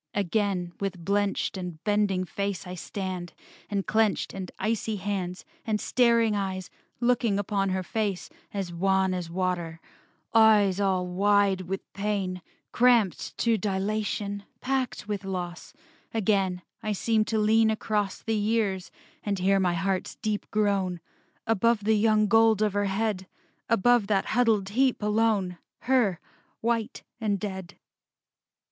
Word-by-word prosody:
Again, 195 -3 0
with 195 -2 -2
blenched 200 0 0
And 180 -3 -5
bending 205 -3 +1
face 200 0 -3
I 180 - -6
stand, 185 -1 -5 0.4
and 200 -2 -1
clenched 220 -1 +1
And 190 -2 -6
icy 220 +1 -1
hands, 190 -2 -3 0.2
and 215 -2 -1
staring 235 -3 +3
eyes, 190 -2 -3 0.3
Looking 240 -4 +2
upon 200 -1 0
her 185 0 -1
face, 205 -1 -2 0.2
as 195 -4 -4
wan 190 +1 +2
As 180 -2 -4
water; 175 -2 -2 0.5
eyes 210 -4 +5
all 190 -2 +1
wide 200 +1 +2
with 195 +1 -3
pain; 195 -3 -2 0.3
Cramped 235 -8 +2
to 230 -2 +2
dilation, 205 0 -2 0.2
packed 260 -5 -2
with 205 -2 -3
loss: 180 -2 -5 0.4
Again 195 -4 +1 0.2
I 215 - -1
seem 220 +2 +1
to 220 - -1
lean 220 +1 +4
across 210 -2 -1
The 225 - -1
years, 210 -3 0 0.3
and 205 -1 -2
hear 195 +2 +3
my 180 -2 +1
heart's 190 0 -1
deep 215 -2 -3
groan 200 -4 0 0.5
Above 225 0 +2
the 220 +2 +3
young 215 0 +3
gold 220 0 +4
of 210 -2 +1
her 205 0 +1
head, 195 -1 -1 0.4
Above 230 0 +4
that 200 -2 +1
huddled 220 -5 +2
heap 255 +1 +1
alone, 210 -4 +1 0.2
Her, 235 -9 +2 0.4
white 230 +1 -1 0.2
and 205 -3 0
dead. 190 -3 -6
200 Hz, 135 wpm, -27 LUFS, 190-220 Hz, 0.5 s, eyes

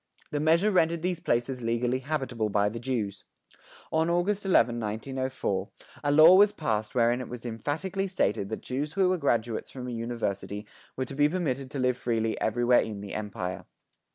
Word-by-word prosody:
The 145 - -1
measure 165 +7 +3
rendered 170 -3 +2
these 180 -2 -1
places 125 0 -1
legally 120 +2 0
habitable 130 -6 -2
by 100 0 +2
the 115 +2 -6
Jews. 110 -6 -3 0.7
On 160 +1 +2
August 195 +4 0
11, 120 -10 +3
1904, 115 -2 -3 0.3
a 145 - +2
law 155 +4 +8
was 205 +2 +7
passed 110 - -2
wherein 120 +1 +3
it 125 - -7
was 125 0 -8
emphatically 160 - -2
stated 100 - 0
that 110 - -4
Jews 145 +4 -3
who 190 -2 +3
were 185 -1 +1
graduates 120 -5 0
from 125 -2 -7
a - - -4
university 115 -3 -3 0.3
were 130 - -2
to 135 - -8
be 145 +2 +3
permitted 140 -7 -2
to 140 - -6
live 125 -1 +1
freely 115 -2 0
everywhere 120 +2 +3
in 105 -2 -5
the 100 - -7
Empire. 100 -4 -4
125 Hz, 180 wpm, -28 LUFS, 115-155 Hz, 0.7 s, law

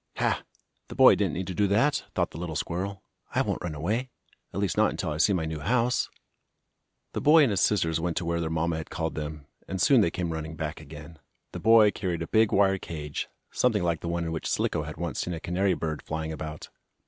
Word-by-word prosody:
"Ha! - - +1 0.5
The - - -9
boy - - +8
didn't - - 0
need 95 - -2
to 95 - -4
do 100 +2 +2
that!" 120 +9 +2
thought - - 0
the 80 - -8
little 85 -2 -4
squirrel. 95 +6 -3 0.3
"I - - +3
won't - - -2
run 85 -4 -4
away 110 - -1 0.4
at 95 - -4
least 100 -3 0
not - - +4
until - - -3
I 75 - -3
see 85 - +4
my 90 -5 0
new 80 -1 -4
house." 120 - +1 1.0
The - - -2
boy 155 +1 +7
and 130 - +3
his 100 - +1
sisters 80 -6 +2
went 85 0 -2
to 90 - -1
where 85 0 0
their 80 - -2
mamma 80 0 0
had 80 - -6
called 80 -1 -3
them, 75 -1 -5 0.2
and 95 - -4
soon 125 +7 +5
they 85 - +3
came 85 -1 -3
running 80 0 -5
back 80 0 -4
again. 75 +1 -11 0.3
The - - -6
boy 110 -1 +6
carried 90 -4 -3
a - - -6
big 110 -1 +3
wire 95 -1 +3
cage, 75 -4 -5 0.2
something - - +1
like 85 -2 0
the 85 - -4
one 85 0 -1
in 80 - -3
which 80 - -3
Slicko - - 0
had 75 - -7
once 85 0 -3
seen 90 - -2
a - - -6
canary 90 +2 +1
bird 80 -2 -3
flying 80 0 -4
about. 80 0 -7
85 Hz, 235 wpm, -27 LUFS, 80-100 Hz, 1.0 s, boy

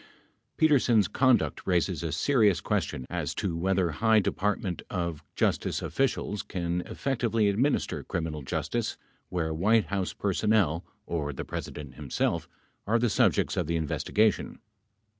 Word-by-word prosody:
Petersen's 125 - +4
conduct 130 -2 +2
raises 90 -1 +1
a 80 -2 -2
serious 105 - +3
question 65 - -2
as - - -2
to 90 -4 -2
whether 90 0 +1
high 110 +7 +3
Department 100 -2 -1
of 85 -4 -3
Justice - - 0
officials 120 -6 -1
can 85 -1 -2
effectively 115 -5 0
administer 125 +9 0
criminal 80 -2 -3
justice 65 - -2 0.3
where 80 -3 -1
White 105 +7 +3
House 95 -2 -2
personnel, 100 -4 +1 0.2
or 75 -4 -2
the - - -5
President 75 -4 -6
himself, 75 +4 -2 0.4
are 115 +3 +3
the 120 -1 +1
subjects - - +2
of - - -1
the 85 - 0
investigation. 100 +6 +1
95 Hz, 130 wpm, -28 LUFS, 85-110 Hz, 0.4 s, Petersen's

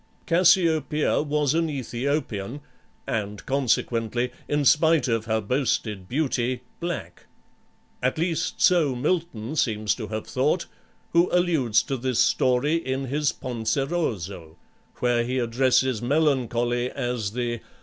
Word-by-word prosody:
Cassiopeia 165 -4 +3
was 150 -1 0
an 165 0 +1
Aethiopian, 130 -3 -3 0.4
and 105 -2 -3
consequently, 125 -2 0 0.2
in 145 -1 0
spite 160 +2 +4
of 115 -2 0
her 110 0 +1
boasted 110 -4 -1
beauty, 125 -3 -1 0.2
black; 165 - -5 0.7
at 125 +3 0
least 165 0 -1
so 160 -7 +4
Milton 150 -3 -2
seems 110 -7 +1
to 110 -4 -6
have 110 +1 -4
thought, 150 +7 0 0.5
who 170 +1 +4
alludes 160 -11 +2
to 135 - -3
this 130 -1 -2
story 130 +8 +3
in 135 -4 -3
his 145 +1 +1
"Penseroso," 110 - -3 0.4
where 120 -1 +1
he 125 +2 -2
addresses 125 0 +2
Melancholy 120 -3 +1
as 120 -6 -3
the 120 -1 -2
130 Hz, 120 wpm, -25 LUFS, 115-150 Hz, 0.7 s, spite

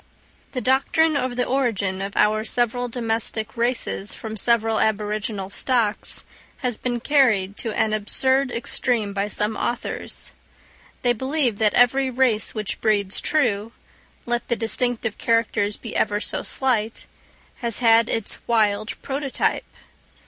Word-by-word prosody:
The 255 - -2
doctrine 275 +5 +2
of 255 -3 -1
the 250 - 0
origin 205 -8 0
of 195 0 -5
our 215 +1 +3
several 245 +2 0
domestic 225 -1 -2
races 230 - -1
from 220 -1 -6
several 225 0 +2
aboriginal 210 -2 -1
stocks, 230 -3 0 0.4
has 245 -2 0
been 245 +1 -2
carried 225 -9 +2
to 225 - -3
an 215 -1 +1
absurd 260 +6 +1
extreme 235 -3 -1
by 200 0 -1
some 210 +1 +1
authors. 240 - -3 0.7
They 245 -1 +4
believe 260 -2 -1
that 215 -2 +3
every 260 +2 +4
race 245 -4 +1
which 215 -2 -3
breeds 205 -3 +1
true, 230 -7 0 0.5
let 240 0 -1
the 235 - +1
distinctive 230 -1 -1
characters 220 -3 +1
be 230 - -8
ever 205 -1 +1
so - - -2
slight, 230 -4 0 0.5
has 235 -3 0
had 230 -1 +5
its 225 - -2
wild 215 -2 +1
prototype. 275 0 -1
230 Hz, 135 wpm, -23 LUFS, 210-250 Hz, 0.7 s, had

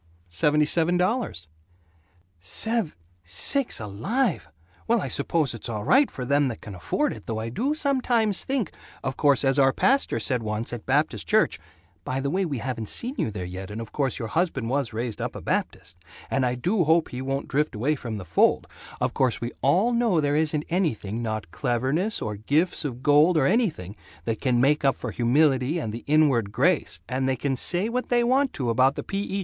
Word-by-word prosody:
"Seventy 150 - +2
seven 170 +3 +2
dollars!" 180 - -1 0.9
"Sev 165 - +1 0.3
Sakes 95 - 0
alive! 120 - -1 0.4
Well, - - +3
I - - -3
suppose 155 -7 0
it's 115 +1 -6
all 105 -2 -3
right 270 - +4
for 125 - -6
them 140 +2 +2
that 120 - -5
can 105 - -9
afford 270 - -1
it, - - -12
though 110 - -3
I 110 +1 -3
do 265 - -1
sometimes 250 - +1
think 260 - -1 0.3
Of 130 -1 -2
course 140 -1 +3
as 135 +1 +3
our 135 -1 +5
pastor 270 - +2
said 125 +2 0
once, 110 +2 -3
at 120 - -7
Baptist 145 +4 0
Church 215 - +2 0.4
By 130 +1 -2
the 140 +1 -2
way, 190 +2 0
we 145 -6 -3
haven't 120 -3 -4
seen 245 +3 -1
you - - 0
there 100 -4 -5
yet, 95 +1 -7
and 105 +2 -6
of 115 -1 -7
course 135 -4 -1
your 115 -3 -4
husband 135 - -1
was 135 -3 0
raised 115 -1 -4
up - - -4
a - - -5
Baptist, 85 +1 -3 0.4
and 135 -1 +2
I 125 - -1
do 180 - +1
hope 160 +1 +3
he 125 - -6
won't 135 +1 -3
drift 150 -1 0
away 130 +9 +1
from 115 -5 -5
the 95 - -7
fold, 85 - +2 0.3
of 125 0 -1
course 130 -4 +1
we 120 +1 -4
all 190 - +3
know 235 -7 +2
there 145 -1 +1
isn't 150 -1 0
anything, 120 - -1
not 110 -6 -4
cleverness 135 - -1
or 105 -1 -4
gifts 155 - +1
of 130 -3 -5
gold 150 +4 +5
or 140 - +3
anything, 160 - 0 0.3
that 115 - -2
can 125 -3 +2
make 145 +4 +3
up 135 -1 +3
for 125 - -5
humility 130 +4 +2
and 110 -10 -3
the 115 - -7
inward 140 -9 +3
grace 95 - +1
and 130 +1 -1
they 130 - +1
can 135 +2 -1
say 175 - 0
what 250 +2 -3
they 240 -1 +3
want 260 +3 +2
to 125 -4 -1
about 130 +4 +3
the - - -5
P. 195 - -3
E. 200 0 -3
135 Hz, 205 wpm, -25 LUFS, 115-175 Hz, 0.9 s, our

